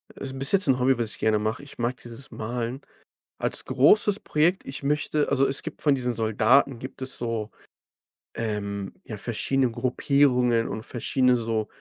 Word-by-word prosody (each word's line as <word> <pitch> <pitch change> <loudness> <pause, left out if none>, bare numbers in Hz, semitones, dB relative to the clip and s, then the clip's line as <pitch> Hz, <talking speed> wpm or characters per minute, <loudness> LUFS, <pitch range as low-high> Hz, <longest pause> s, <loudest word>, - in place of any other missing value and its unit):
Ist 135 0 -6
bis 135 +1 +2
jetzt 195 -2 +2
'n 130 -2 +3
Hobby, 130 0 +3
was 115 -2 -2
ich - - -9
gerne 110 -1 +2
mache, 110 +5 -2
ich 145 - -13
mag 120 +1 -1
dieses 120 +4 -11
Malen. 120 +3 -4 0.6
Als - - 0
großes 195 +10 +4
Projekt 170 +5 +1
ich 135 +1 -7
möchte 150 +1 0
also, 135 0 +3
es 135 - -1
gibt 160 - -7
von 145 -2 +4
diesen 125 -2 -1
Soldaten 115 +4 +3
gibt 130 +2 -9
es 130 0 -5
so, 115 -3 -3 0.8
ähm, 100 -3 -3
ja, 110 - -7
verschiedene 125 +4 0
Gruppierungen 125 -1 +2
und 110 - -5
verschiedene 125 +1 +1
so 110 -2 -1
125 Hz, 175 wpm, -25 LUFS, 115-135 Hz, 0.8 s, großes